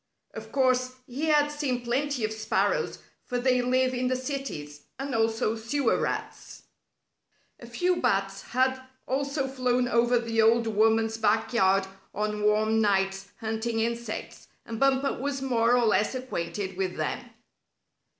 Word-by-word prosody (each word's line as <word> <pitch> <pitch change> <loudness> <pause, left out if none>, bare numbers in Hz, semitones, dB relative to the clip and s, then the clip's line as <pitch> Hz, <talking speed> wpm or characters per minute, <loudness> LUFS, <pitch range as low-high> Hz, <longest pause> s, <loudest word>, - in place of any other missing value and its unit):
Of - - -9
course, 255 -1 +2
he 265 +5 -4
had 295 -1 +3
seen 270 -5 -2
plenty 255 0 0
of 215 - -3
sparrows, 220 0 0 0.3
for 250 - -3
they 250 0 +2
live 255 +1 +2
in 250 0 0
the 255 - +1
cities, 255 - -5
and 275 0 -4
also 225 0 +1
sewer 230 +3 0
rats. - - -4 1.0
A 235 - -11
few 355 +10 0
bats 195 -5 0
had 260 +1 0 0.3
also 275 +1 -1
flown 250 -2 0
over 240 +1 +3
the 230 -1 +1
old 230 +1 +4
woman's 225 +1 +2
backyard 205 -3 +2 0.3
on 210 0 -2
warm 215 +1 +3
nights 195 -1 +1
hunting 225 +1 -2
insects, 235 -1 -4 0.2
and 225 -1 -6
Bumper 275 0 +2
was 280 0 -2
more 240 -2 +3
or 240 - +3
less 215 +3 +2
acquainted 190 -6 -4
with 190 -2 -2
them. - - -1
235 Hz, 140 wpm, -27 LUFS, 220-260 Hz, 1.0 s, old